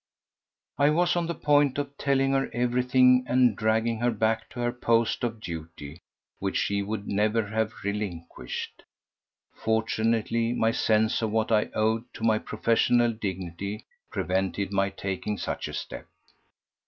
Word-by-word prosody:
I 145 +1 +5
was 175 +4 +2
on 170 -1 0
the 170 - -3
point 145 -2 +3
of 140 -1 -3
telling 135 -1 +1
her 135 0 +1
everything, 125 +1 +4
and 125 -3 +3
dragging 110 +1 +1
her 120 +1 +2
back 110 0 0
to 125 - -9
her 120 0 +1
post 115 -2 +1
of 115 -2 -2
duty 80 -3 -8 0.4
which 95 0 -1
she 100 0 0
should 105 0 -4
never 105 +2 +1
have 110 +1 -3
relinquished. 95 -10 -5 0.7
Fortunately 115 +1 0
my 115 -2 +2
sense 110 -1 +2
of 110 - 0
what 110 +1 0
I 105 -1 +4
owed 110 +2 0
to - - -8
my 110 -1 +4
own - - -9
professional 115 +2 +2
dignity 95 -1 -5 0.2
prevented 95 +1 -1
my 100 0 +2
taking 100 +1 -4
such - - -3
a - - -8
step. - - -7
110 Hz, 150 wpm, -27 LUFS, 100-120 Hz, 0.7 s, I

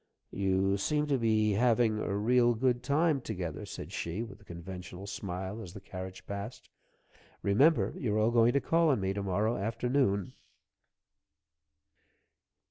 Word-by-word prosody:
"You 95 0 +1
seem 150 +9 0
to - - +2
have 130 - +1
been 110 -2 +3
having 115 -2 +3
a 100 -1 -1
real 120 +2 +3
good 125 +1 +1
time 145 +2 +2
together," 90 -9 -5
said - - -7
she, 85 +7 -3
with 110 -2 -11
a - - -17
conventional 90 +1 -8
smile, 100 0 -5
as 90 -5 -9
the - - -6
carriage 95 -1 -8
passed. 100 +4 -7 0.7
"Remember, 135 +11 +4
you're 110 -5 -1
all 110 +2 +3
going 120 0 +4
to 140 - +2
call 165 0 +3
on 135 - +2
me 95 0 -1
to 100 - -3
morrow 100 +4 0
afternoon." 110 -1 0
105 Hz, 150 wpm, -31 LUFS, 95-120 Hz, 0.7 s, Remember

